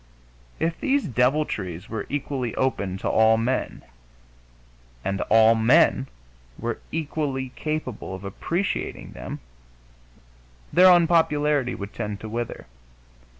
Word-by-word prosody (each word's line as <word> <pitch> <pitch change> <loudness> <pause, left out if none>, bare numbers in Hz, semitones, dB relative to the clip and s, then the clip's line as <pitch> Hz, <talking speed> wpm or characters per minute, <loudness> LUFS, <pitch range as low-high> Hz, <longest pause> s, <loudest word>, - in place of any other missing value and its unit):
If 165 0 -1
these 280 0 +1
deviltries 120 - 0
were 110 -3 -5
equally 135 -4 -3
open 100 -8 -1
to - - -4
all 110 0 +4
men, 125 +3 -2 1.2
and 100 0 -1
all 110 +1 +6
men 115 +3 +4 0.5
were 120 -1 -3
equally 145 -4 -2
capable 130 -9 -4
of 95 - -10
appreciating 170 - -3
them, 60 +1 -7 1.3
their 185 +1 +8
unpopularity 150 -6 +3
would 100 0 -7
tend 105 -3 -4
to 110 - -6
wither. 120 +1 -4
125 Hz, 105 wpm, -24 LUFS, 110-150 Hz, 1.3 s, their